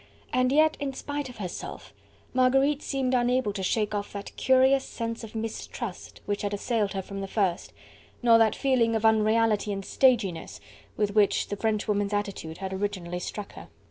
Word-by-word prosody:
And 255 0 +3
yet 310 +2 +4
in 280 -1 -3
spite 285 0 -4
of 250 - -11
herself, 185 -4 -7 0.4
Marguerite 270 +3 +3
seemed 265 -2 -1
unable 245 -3 +2
to 195 - -4
shake 210 +3 0
off 205 -1 -3
that 200 0 -7
curious 265 +1 +4
sense 230 0 -5
of 225 0 -9
mistrust 225 -1 -6
which 205 0 -2
had 205 0 -1
assailed 210 -1 -1
her 195 -1 -3
from 195 +1 -6
the 195 - -4
first, 190 -3 -1 0.5
nor 230 -1 +6
that 225 -1 +4
feeling 245 -4 +2
of 220 0 0
unreality 220 -1 +3
and 195 -1 -4
staginess 230 -10 +1 0.4
with 210 -1 +1
which 210 -1 +3
the 205 - -2
Frenchwoman's 210 -1 0
attitude 200 -6 -3
had 190 -1 -5
originally 190 -3 -3
struck 205 +3 -6
her. - - -11
220 Hz, 175 wpm, -27 LUFS, 200-255 Hz, 0.5 s, nor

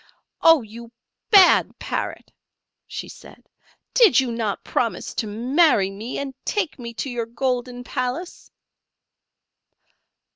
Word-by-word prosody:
"Oh, 325 -5 +6
you 230 +2 -11 0.4
bad 390 -5 +6
Parrot!" - - -5 0.6
she - - -6
said; - - -15 0.5
"did 460 - +6
you 260 -2 0
not 225 -3 -3
promise 230 -2 -2
to 220 - -3
marry 235 - +2
me, 215 +5 -6
and 280 -1 -4
take 385 -9 -2
me 235 -1 -6
to 275 - -4
your 235 -2 -3
golden 245 0 -3
palace?" 255 +8 -5
245 Hz, 115 wpm, -22 LUFS, 230-290 Hz, 0.6 s, Oh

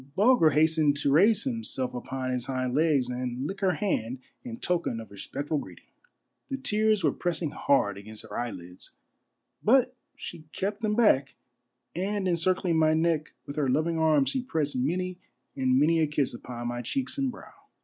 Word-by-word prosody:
Bulger 210 -5 +5
hastened 155 -1 +3
to 140 -1 +1
raise 205 +8 +5
himself 230 - -3
upon 130 +1 -4
his 125 -1 -2
hind 130 -2 -1
legs 145 -3 +3
and 125 +1 -3
lick 195 +6 -4
her 190 -2 +2
hand 135 - -1 0.3
in 115 -1 -6
token 170 -9 -1
of 110 - -10
respectful 145 +9 -3
greeting. - - -11 0.6
The 270 - -2
tears 215 -6 +1
were 150 - +4
pressing 170 -2 -2
hard 100 -8 +1
against 110 +1 -9
her 105 -2 -9
eyelids, 90 -7 -6 0.7
but 255 +2 +4 0.2
she 165 -3 -8
kept 205 +3 -3
them 210 -1 0
back, 145 - +3 0.6
and 195 +2 -1
encircling 175 0 +1
my 155 0 +4
neck 160 -1 0
with 140 - -8
her 140 -3 +1
loving 160 +5 +1
arms, 155 -3 +3
she 260 - -1
pressed 155 - -2
many 180 +8 -1 0.4
and 130 -1 +2
many 165 +3 +4
a 160 - +3
kiss 145 -3 0
upon 120 0 -6
my 120 0 -3
cheeks 270 - -2
and 270 -1 +1
brow. - - -13
155 Hz, 170 wpm, -28 LUFS, 130-185 Hz, 0.7 s, Bulger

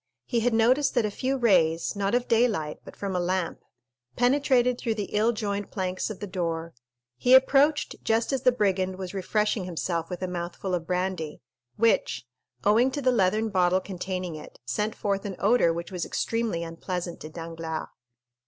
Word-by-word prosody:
He 240 - 0
had 245 +2 +2
noticed 255 +7 +3
that 240 -3 +3
a 210 - -1
few 265 +5 -1
rays, 175 -10 +3
not 200 +2 0
of 245 0 0
daylight, 220 -10 +1
but - - -12
from 195 -2 -4
a - - +1
lamp, 180 -1 -1 0.6
penetrated 250 -1 +3
through 225 -2 -1
the 210 -2 -4
ill 215 +3 +3
joined 205 -3 -3
planks 185 0 -2
of 215 - -6
the - - -4
door; 170 -3 -3 0.4
he 250 - +6
approached 280 +3 +4
just 225 +4 +1
as 265 - 0
the 255 - +5
brigand 190 -5 0
was 185 -1 -6
refreshing 210 +1 0
himself 170 -1 -2
with 180 0 -5
a - - 0
mouthful 180 +1 -4
of 170 -2 -2
brandy, 180 -4 -2 0.4
which, 205 - +2 0.4
owing 230 +5 +4
to 285 +2 -4
the 255 - +4
leathern 215 0 +2
bottle 185 -2 +3
containing 185 -2 -4
it, 155 - -10
sent 210 - -1
forth 200 -1 -1
an 195 -2 -4
odor 205 -4 +4
which 170 +3 -5
was 180 -2 -3
extremely 225 -7 -1
unpleasant 175 +1 -5
to 155 - -8
Danglars. 165 -1 -5
195 Hz, 180 wpm, -27 LUFS, 175-230 Hz, 0.6 s, he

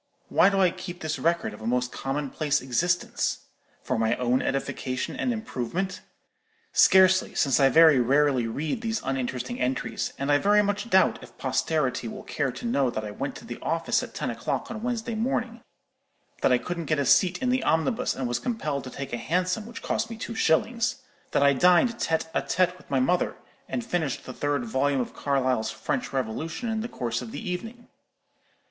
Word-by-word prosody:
Why - - +5
do 195 -1 0
I 185 -2 +4
keep 175 0 -8
this 155 0 -2
record 170 -6 0
of 105 - -11
a 110 - -4
most 125 +1 0
commonplace 145 +2 -1
existence? 170 +8 0 0.4
For - - -1
my 115 +1 +2
own 125 +1 +1
edification 130 -1 -2
and 255 - 0
improvement? 190 - -3 0.7
Scarcely, 185 -1 +5
since 135 -1 +3
I 135 -1 +6
very 160 -2 +7
rarely 135 -1 +3
read 150 - -3
these 225 -2 -1
uninteresting 125 -2 -3
entries; 125 +1 -2
and 140 +1 -1
I 145 - +5
very 210 +3 +4
much 205 +3 -2
doubt 190 -2 +4
if - - -14
posterity 140 -7 0
will - - -7
care 140 -3 -2
to 125 - -8
know 140 - +2
that 110 -2 -4
I 105 - -5
went - - -4
to - - -10
the - - -7
office - - 0
at - - -8
ten - - -2
o'clock - - -3
on 220 -2 -5
Wednesday 235 -1 -2
morning; 235 +1 -2 0.8
that - - +3
I 125 - +5
couldn't 170 +5 -4
get 155 +1 +1
a 140 - 0
seat 180 +7 +4
in 255 - 0
the 255 +1 +1
omnibus, 220 +10 +1
and 130 - -2
was 120 - -1
compelled 155 - -3
to - - -6
take 135 +1 -7
a - - 0
Hansom, 185 - -1
which 235 - -9
cost 225 - -1
me 230 - -7
two 230 - -5
shillings; 225 +6 +1 0.3
that - - +2
I 140 0 +6
dined 180 - +4
tête 160 0 -1
à - - 0
tête 180 0 +1
with 185 - -19
my 135 - +2
mother, 155 +8 +1 0.3
and 240 - -3
finished 165 - -2
the 130 - -7
third 145 -3 -1
volume 135 +4 +1
of 125 - -3
Carlyle's 130 -5 0
'French - - -3
Revolution' 145 - -3
in 220 -1 -1
the 235 - -4
course 120 - -3
of 120 -3 -7
the 145 - -6
evening. 225 +7 -5
155 Hz, 195 wpm, -26 LUFS, 130-200 Hz, 0.8 s, very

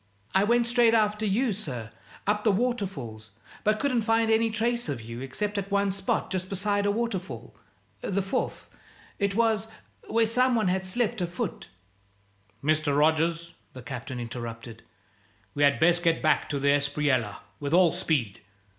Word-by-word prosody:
"I 195 - +4
went 235 +3 +3
straight 235 -1 +4
after 215 0 +2
you, 220 +4 +1
sir, 125 - -5 0.3
up 210 +1 +1
the 220 - +4
waterfalls; 190 - -2 0.3
but 215 0 +2
couldn't 255 -3 +1
find 225 0 +2
any 225 +1 +3
trace 235 -1 -1
of 135 -4 -2
you 115 +2 -8
except 205 +10 -2
at 200 0 -5
one 200 -1 +2
spot 195 0 -1
just 185 0 -2
beside 205 +1 0
a - - +3
waterfall 190 - -4 0.5
the 200 0 -1
fourth, 195 - -3 0.5
it 200 -1 0
was 225 -2 +2 0.4
where 230 0 +3
some 250 +2 +3
one 215 -5 +2
had 190 +1 0
slipped 220 +2 0
a 175 - 0
foot 175 +1 -5 0.5
" 100 +2 -37
"Mr. 155 -1 +1
Rogers," 165 +2 +2 0.2
the 130 - -10
Captain 125 0 -6
interrupted, 115 -1 -7 0.7
"we 145 - -3
had 140 -4 +4
best 175 +2 +4
get 165 -1 +2
back 155 0 +2
to 145 - -1
the 140 +1 +1
Espriella 140 -6 +1 0.2
with 145 -1 -3
all 175 -1 +5
speed. 150 - -1
185 Hz, 165 wpm, -27 LUFS, 140-215 Hz, 0.7 s, all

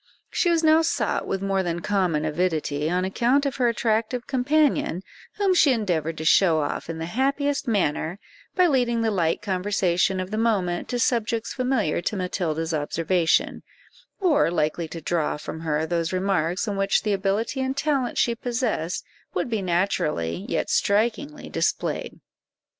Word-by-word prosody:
She 350 - +1
was 335 -1 +2
now 315 +1 +6
sought 325 - -1
with 195 0 -2
more 195 -1 +1
than 170 -2 -2
common 180 -7 0
avidity, 155 -2 -1
on 180 +2 0
account 245 +8 +2
of 275 - -2
her 250 -2 +2
attractive 230 +1 0
companion, 275 - +1 0.3
whom 395 -2 +2
she 325 -6 +5
endeavoured 170 - -1
to 160 - -5
show 165 -1 +5
off 145 +2 -4
in 165 - -4
the 160 - -4
happiest 280 - 0
manner, 180 -5 0 0.4
by 365 - +5
leading 245 -7 +2
the 225 - +1
light 170 -5 0
conversation 190 -1 +1
of 185 +1 -4
the 215 - -1
moment 190 -7 0
to 245 - -1
subjects 230 -2 0
familiar 250 - 0
to 210 - -2
Matilda's 170 -3 -2
observation, 165 +3 +1 0.6
or 315 - +3
likely 165 0 -1
to 165 +1 -8
draw 160 -2 -1
from 155 +1 -7
her 160 -1 -1
those 165 0 -1
remarks 185 0 0
in 200 -2 -2
which 195 0 +2
the 210 -2 +1
ability 205 +7 -1
and 265 +1 -2
talent 280 -4 0
she 235 - +2
possessed 235 -8 -2 0.3
would 180 +7 -1
be 220 -3 0
naturally, 175 - -1
yet - - -1
strikingly, 235 +8 0
displayed. - - -2
195 Hz, 160 wpm, -24 LUFS, 170-245 Hz, 0.6 s, now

